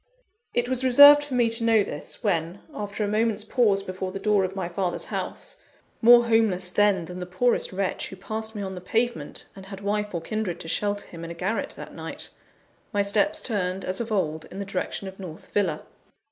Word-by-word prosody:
It 240 0 +1
was 260 0 -1
reserved 285 +3 +9
for 285 -3 -5
me 240 -2 +4
to 230 0 +2
know 225 -2 +4
this, 150 +7 -6
when 175 -2 -1
after 205 0 -4
a - - 0
moment's 215 0 0
pause 210 -3 +2
before 185 0 -5
the 195 - -5
door 205 0 +2
of 190 +1 -3
my 190 -3 -2
father's 180 0 -2
house, - - -5 0.4
more 240 +1 +8
homeless, 215 -6 +2
then, 200 -3 +3
than 180 +2 -8
the 180 - -5
poorest 235 +7 +1
wretch 190 0 -2
who - - -9
passed 220 +3 -5
me 205 - -4
on 190 -1 -5
the 180 - -7
pavement, 235 +6 -2
and 190 -1 -11
had 195 0 -8
wife 210 -1 -2
or 170 - -2
kindred 215 -1 -3
to - - -8
shelter 205 +4 -1
him 170 -1 -10
in 165 - -6
a 170 - -7
garret 195 +6 -2
that - - -9
night - - -6 0.6
my 205 -3 +1
steps 295 +10 +1
turned, 190 -4 -1
as 185 +4 -2
of 230 -1 -5
old, 160 -6 -1
in 190 - -11
the 200 - -4
direction 195 0 -4
of 190 +1 -10
North 170 -4 -10
Villa. 180 -7 0
200 Hz, 215 wpm, -25 LUFS, 185-225 Hz, 0.6 s, reserved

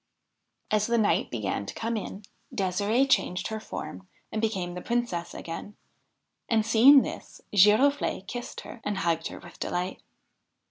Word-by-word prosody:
As 210 -1 +2
the 235 0 +2
night 215 -2 +2
began 100 -3 -3
to - - -6
come 230 +1 -2
in, 205 -1 -5 0.3
Ddsirde 205 +7 +1
changed 185 -8 +1
her 220 0 -3
form 95 - -7 0.2
and 215 - -2
became 190 -6 -1
the 180 - -6
Princess 235 -8 -2
again; 170 +5 -7 0.7
and, 220 -2 +2
seeing 250 +5 +7
this, - - -8
Giroflee 210 +3 +4
kissed 245 +4 -6
her 240 - -11
and 205 -1 -2
hugged 165 -3 0
her - - -8
with 175 - -13
delight. 180 +1 -3
210 Hz, 150 wpm, -27 LUFS, 180-230 Hz, 0.7 s, seeing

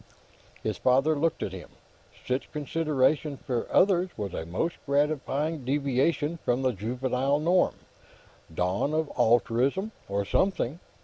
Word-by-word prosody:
His - - -2
father 135 +5 +3
looked 160 +2 0
at - - -3
him. - - -9 0.6
Such 130 +1 -2
consideration 150 -1 0
for 125 -3 -3
others 185 -1 +4
was 100 -4 -4
a 80 - -4
most 165 - -2
gratifying 145 +1 0
deviation 140 +4 0
from 125 +2 +1
the 130 - +3
juvenile 125 +6 -1
norm; 175 +4 +2 0.8
dawn 90 - 0
of 160 -2 -1
altruism, 125 - +2 0.2
or 100 0 -1
something. 170 - 0
140 Hz, 125 wpm, -27 LUFS, 125-155 Hz, 0.8 s, others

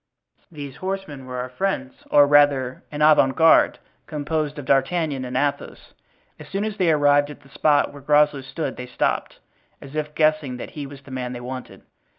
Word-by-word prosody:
These 145 -4 -8
horsemen 185 -9 -5
were 125 0 -6
our 125 +1 -4
friends, 130 -3 -3
or 145 -1 +6
rather, 140 -3 +3
an 150 0 -1
avant 150 -3 +5
garde, 165 0 +5 0.3
composed 150 0 -2
of 145 - -7
D'Artagnan 140 +1 +1
and 125 0 -3
Athos. 145 +1 -3 0.5
As 150 - -11
soon 195 +6 -2
as 215 -1 -4
they 175 -3 +3
arrived 145 -1 +3
at 150 - -11
the 135 - -20
spot 145 0 +2
where 145 - -11
Groslow 150 0 +3
stood 135 +2 -5
they 125 - -7
stopped, 125 - -2 0.4
as 135 - -12
if 150 0 -4
guessing 155 -5 +1
that - - -8
he 145 -2 -6
was 140 0 -12
the 135 - -13
man 125 -1 -4
they 120 - -6
wanted. 125 +1 -8
145 Hz, 185 wpm, -23 LUFS, 130-155 Hz, 0.5 s, or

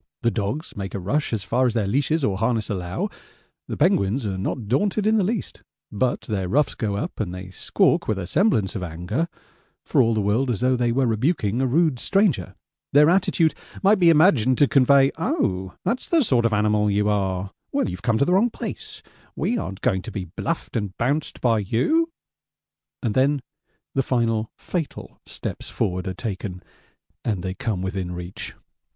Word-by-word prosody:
The 115 - +3
dogs 115 +9 -3
make 95 -1 -5
a - - -2
rush 140 +12 -1
as 110 -4 -2
far 125 +7 +2
as 120 - -1
their 110 -3 +1
leashes 145 +8 +1
or 100 -6 +1
harness 110 +1 0
allow. 90 -3 -2 0.6
The - - -4
penguins 105 +6 +2
are 100 -2 -2
not 100 +4 -3
daunted 200 - +1
in 220 +1 +4
the 205 - +3
least, 210 +2 -3 0.3
but 125 +4 0
their 95 -4 -3
ruffs 145 +7 +2
go 105 -4 -2
up 100 - -4
and 100 -5 -2
they 90 +1 -8
squawk - - +1
with 110 - 0
semblance 150 - +2
of 100 - -3
anger, 90 - -2 0.6
for - - +3
all 115 -2 +2
the - - +1
world 110 +7 +1
as 115 - 0
though 130 0 +3
they 120 -1 +1
were 130 +2 +2
rebuking 115 - +1
a 135 - +2
rude 150 -1 +2
stranger 195 - +1 0.4
their 150 +3 +6
attitude 175 -3 +3 0.3
might 200 +1 +5
be 175 -2 +6
imagined 150 - +5
to 145 - +5
convey 135 0 +5
'Oh, 95 - -1
that's 245 - -1
the 330 -3 +4
sort 125 - +2
of - - -4
animal 105 0 +2
you 105 +1 +1
are; 95 -2 0 0.2
well, - - +1
you've 90 0 -5
come 115 -2 +1
to 140 - +3
the 180 - +2
wrong 210 +6 +4
place - - -7 0.3
we 240 - 0
aren't 95 - -6
going 95 -7 +1
to 115 - -8
be 95 -2 -4
bluffed 130 - -4
and 105 -4 -3
bounced 140 +6 -1
by 115 -3 +3
you,' 215 - +1 0.9
and 115 -4 0
then 135 +2 +2 0.5
the 135 - +2
final 115 -4 0
fatal 170 -5 -5
steps - - -6
forward 90 0 -2
are 95 - -3
taken 95 -3 -5 0.6
and 100 -6 -1
they 95 -1 -2
come 100 -2 -3
within 95 -2 -3
reach. 90 +1 -7
115 Hz, 190 wpm, -23 LUFS, 100-145 Hz, 0.9 s, their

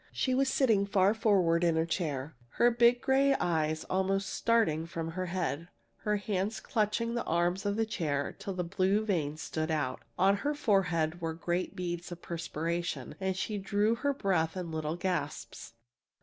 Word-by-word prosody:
She 260 - 0
was 265 +1 +2
sitting 225 -8 +3
far 195 0 +4
forward 190 -7 +3
in 170 -2 +3
her 160 0 +2
chair, 155 -4 -2 0.2
her 240 0 +4
big 240 +1 +4
gray 275 +1 +3
eyes 160 -2 0
almost 190 +1 0
starting 165 -9 +2
from 165 -1 -4
her 185 +2 -3
head, 170 -3 -2 0.3
her 210 -1 0
hands 200 0 -2
clutching 230 +1 0
the 235 - -1
arms 175 +4 +1
of 200 - 0
the 225 +1 +1
chair 150 -9 -2
till 195 - -5
the 180 - -1
blue 190 +4 +1
veins 155 -7 -1
stood 155 0 -2
out. 150 -5 -1 0.2
On 195 +2 +4
her 295 +8 -1
forehead 175 - +1
were 165 -1 -2
great 175 +2 -2
beads 175 0 -4
of 175 - -6
perspiration, 170 0 -3
and 190 -1 -1
she 210 +2 -2
drew 205 +3 +1
her 285 +5 0
breath 185 - 0
in 175 -3 -4
little 155 0 -2
gasps. 175 -9 -4
185 Hz, 175 wpm, -31 LUFS, 165-210 Hz, 0.3 s, far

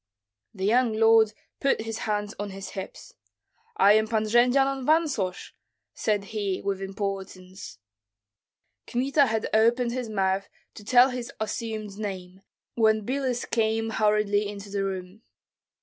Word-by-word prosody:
The 190 -1 -3
young 235 +2 +3
lord 225 0 +5 0.3
put 275 -4 +1
his 225 0 -5
hands 205 0 -1
on 205 0 -3
his 195 0 -8
hips: 190 -1 -8 0.6
"I 205 - +6
am 215 0 +3
Pan 220 -1 0
Jendzian 250 +5 +3
of - - -7
Vansosh," 280 - 0 0.4
said 210 -2 0
he, 200 -3 -1
with 195 -1 -3
importance. 190 - -6 1.1
Kmita 275 +3 +2
had 220 -1 -1
opened 235 +2 +3
his 245 -2 -4
mouth 195 -1 0 0.2
to 210 - -12
tell 250 +4 +5
his 245 -1 -5
assumed 215 -2 -4
name, 190 -3 -6 0.3
when 220 -2 +2
Biloüs 260 -1 -2
came 225 0 0
hurriedly 210 -1 +1
into 200 -1 -8
the 200 -1 -1
room. 190 +1 -5
215 Hz, 135 wpm, -26 LUFS, 200-235 Hz, 1.1 s, I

